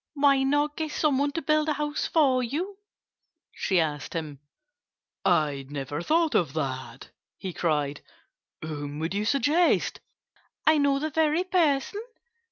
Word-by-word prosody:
"Why 280 -1 +4
not 290 +2 +1
get 315 -1 -2
some 295 -4 +1
one 285 0 +1
to 330 - -3
build 305 +1 +2
a - - +2
house 295 0 -2
for 270 -6 +3
you?" 345 - -3 0.7
she 190 -3 +1
asked 150 -3 -2
him. 150 -4 -4 0.8
"I 150 -7 +1
never 145 +1 -4
thought 320 - +2
of 155 -7 +1
that!" 130 -4 -5 0.3
he 185 -2 -6
cried. 150 -4 -1 0.6
"Whom 145 -2 -5
would 160 +3 -2
you 205 +1 -1
suggest?" 290 +8 +2 0.7
"I 310 -1 +5
know 280 -1 +3
the 310 +2 -2
very 320 +3 +2
person!" 350 0 +1
275 Hz, 145 wpm, -27 LUFS, -, 0.8 s, I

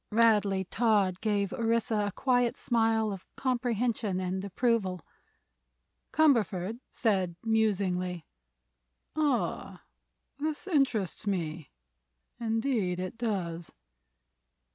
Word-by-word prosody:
Radley 210 -4 +3
Todd 200 -3 +1
gave 205 -3 0
Orissa 225 -2 +1
a - - -2
quiet 245 +1 +1
smile 225 -2 +1
of 190 - -8
comprehension 235 -5 0
and 185 +1 -2
approval. 200 - 0 1.1
Cumberford 230 - +2
said, 190 -7 0
musingly: 185 -6 0 0.9
"Ah; 295 -5 -1 0.6
this 305 +3 -2
interests 250 - 0
me; 165 -6 -2 0.7
indeed 225 -5 0
it 185 +3 -4
does." 185 -8 -3
215 Hz, 85 wpm, -29 LUFS, 185-235 Hz, 1.1 s, Radley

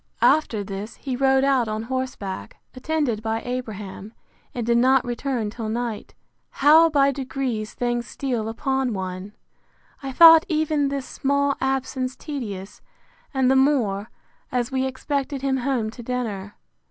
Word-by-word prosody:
After 235 -9 +3
this, 200 +3 -6
he 265 -3 -4
rode 265 +1 +3
out 270 -4 +2
on 215 0 -3
horseback, 230 - -4 0.2
attended 265 -4 -1
by 225 0 -2
Abraham, 220 -4 -6 0.4
and 240 -2 -4
did 235 0 +3
not 260 +1 +4
return 240 -3 -2
till 225 -1 -5
night. 230 -1 -4 0.3
How 315 +4 +6
by 280 -2 +3
degrees 260 -5 -3
things 240 -1 -1
steal 240 -5 -3
upon 265 +2 -1
one! 190 +1 -5 0.7
I 270 -1 -5
thought 325 +3 +9
even 310 -2 +1
this 275 -1 -3
small 280 +1 0
absence 265 -1 -1
tedious; 210 -9 -6 0.5
and 265 -2 +2
the - - +4
more, 240 -7 +2 0.4
as 245 0 -1
we 260 0 0
expected 275 +1 -3
him 270 -1 +1
home 245 -4 -1
to 240 - -10
dinner. 225 -5 -4
255 Hz, 140 wpm, -23 LUFS, 220-275 Hz, 0.7 s, thought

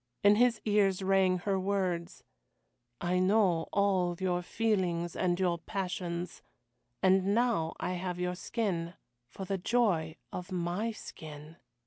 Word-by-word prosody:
In 205 +1 +6
his 240 -2 +4
ears 200 -3 +2
rang 190 -1 +3
her 190 +2 -1
words, 185 -3 -2 0.8
"I 180 +1 0
know 185 -3 +3
all 190 -3 +2
your 180 -2 0
feelings 180 -5 0
and 180 -1 0
your 175 -2 +1
passions. 180 -2 -4 0.6
And 190 +1 +4
now 230 -10 +1
I - - -2
have 180 0 -3
your 180 0 -1
skin 180 -3 -2 0.3
for 190 +9 -7
the 195 0 -2
joy 180 -8 +1 0.2
of 180 +2 -6
my 180 +5 -1
skin." 155 -5 -10
185 Hz, 130 wpm, -31 LUFS, 175-200 Hz, 0.8 s, In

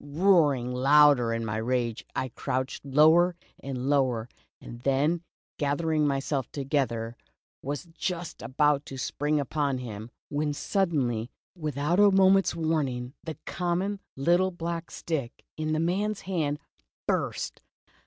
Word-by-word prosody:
Roaring 145 -6 +3
louder 135 -2 +5
in 115 0 -2
my 110 0 -2
rage, 120 0 -1
I 130 - -1
crouched 130 +2 -3
lower 160 +6 +5 0.2
and 130 -1 -4
lower, 130 -5 +1 0.3
and 120 - -10
then 140 +6 +1 0.4
gathering 150 +1 +1
myself 135 -1 -1
together, 130 -5 -1 0.5
was 145 +1 -4
just 175 0 -4
about 145 +1 +2
to 135 - -7
spring 150 +3 0
upon 140 -1 -1
him, 110 -3 -7 0.2
when 150 0 -1
suddenly, 135 - 0 0.3
without 155 +1 -1
a 205 0 +7
moment's 195 -1 +4
warning, 140 -7 -1
the 160 -3 -6
common 180 +3 -1 0.2
little 175 +7 +3
black 170 -1 -4
stick 145 -8 -4
in 155 0 -2
the 155 - +1
man's 195 +5 0
hand, 160 -6 -1 0.5
burst! - - -1
145 Hz, 125 wpm, -28 LUFS, 130-170 Hz, 0.5 s, a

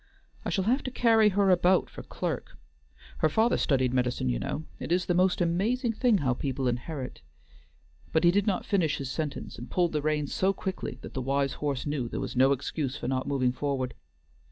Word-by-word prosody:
"I - - -2
shall 190 - 0
have 250 +7 +2
to - - -1
carry 225 -4 +4
her 200 -1 +3
about 180 +1 +4
for - - -9
clerk. - - -4 0.6
Her 155 - +3
father 220 +9 +3
studied 130 -4 +1
medicine 125 - 0
you - - 0
know. 155 - -3 0.2
It - - -5
is 180 +1 +2
the 175 - +1
most 180 +1 +2
amazing 225 +9 +1
thing 235 -1 +3
how 130 -7 +1
people 135 0 -2
inherit" 125 - -4 0.9
but 160 - +2
he 170 - +6
did 205 +3 +1
not 195 -3 0
finish 175 -7 +1
his 135 -1 -4
sentence 155 -2 -4
and - - -8
pulled 175 -2 +1
the 150 - -1
reins 150 -1 -1
so 190 +1 +2
quickly 190 -10 -4
that - - -9
the 130 - -2
wise 140 +1 0
horse 140 -3 -1
knew 145 -5 -2
there - - -4
was - - -4
no 130 +2 +5
excuse 140 0 -2
for - - -5
not 130 0 -1
moving 130 -3 +1
forward. 130 -1 -2
150 Hz, 205 wpm, -28 LUFS, 130-190 Hz, 0.9 s, he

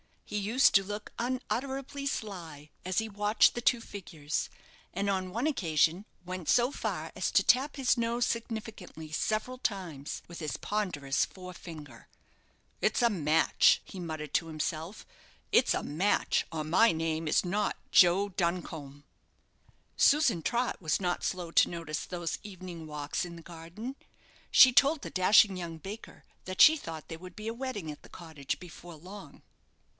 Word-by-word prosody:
He - - -7
used 220 +7 +3
to 195 - +6
look 205 +2 -6
unutterably 270 +3 -3
sly 170 - -5 0.2
as 185 0 -3
he 220 0 -3
watched 210 +1 +3
the 240 - -4
two 240 0 +3
figures; 165 -9 -4 0.4
and 200 +2 -1
on 190 -1 -1
one 230 +8 -2
occasion 170 - +1 0.2
went 180 -2 -6
so 245 +2 +4
far - - -4
as - - -1
to - - +4
tap 270 +4 +3
his 265 -2 +2
nose 235 +1 +1
significantly 220 -8 -5
several 215 +9 -1
times 175 - -4
with 170 - -8
his 155 -3 -3
ponderous 165 -10 -1
fore 180 -1 -10
finger. 150 -9 -11 0.7
"It's 215 - +1
a 235 - +5
match!" 160 -5 +3
he 190 - -10
muttered 155 -4 -6
to 165 - +1
himself; 160 +3 -4 0.5
"it's - - +4
a - - -2
match, 180 +8 +1
or 160 -2 -3
my 175 +9 +4
name 160 0 -2
is 155 - +2
not 205 +4 -1
Joe 185 +3 +5
Duncombe." 165 -6 -3 0.9
Susan 275 - +4
Trott 240 +5 -1
was 155 -3 +1
not 180 -2 -1
slow 180 -3 -3
to - - +5
notice 165 -3 -4
those 175 -2 -4
evening 185 -5 -9
walks 150 +3 -3
in 170 -1 -9
the 165 - -11
garden. 175 +10 -8 0.5
She 260 - +8
told 280 +4 +4
the - - -7
dashing 195 +1 +5
young 170 -2 -6
baker 195 +7 -9 0.2
that 185 0 -1
she 315 - +9
thought 160 - -8
there 165 - -7
would 185 +1 -11
be 215 0 -5
a - - -3
wedding 235 -10 -4
at 145 - -11
the - - -16
cottage 160 -6 -6
before 175 -1 -11
long. 185 +6 -12
185 Hz, 160 wpm, -30 LUFS, 160-220 Hz, 0.9 s, she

